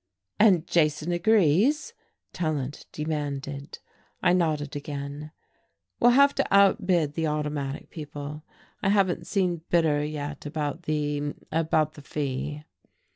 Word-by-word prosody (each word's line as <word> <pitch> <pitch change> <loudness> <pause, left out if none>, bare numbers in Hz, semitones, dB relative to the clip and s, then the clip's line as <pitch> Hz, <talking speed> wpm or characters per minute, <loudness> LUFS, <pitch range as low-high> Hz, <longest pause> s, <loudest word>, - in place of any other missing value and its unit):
"And 190 -6 +5
Jason 155 0 +1
agrees?" 220 - +3 0.4
Tallant 150 -5 -3
demanded. 145 -2 -4 0.5
I 175 - +5
nodded 155 -5 0
again. 145 +1 -6 0.7
"We'll 240 - +6
have 280 +3 +6
to - - 0
outbid 185 -6 +4
the 160 0 -1
Automatic 150 -2 -3
people. 150 -1 -7 0.4
I 195 - +1
haven't 195 -3 +2
seen 180 -5 0
Bitter 155 -4 +3
yet 150 -1 -5
about 150 +2 -3
the 145 -1 -1 0.2
about 155 -1 +1
the 150 - -12
fee." 145 +1 -4
155 Hz, 115 wpm, -26 LUFS, 145-175 Hz, 0.7 s, We'll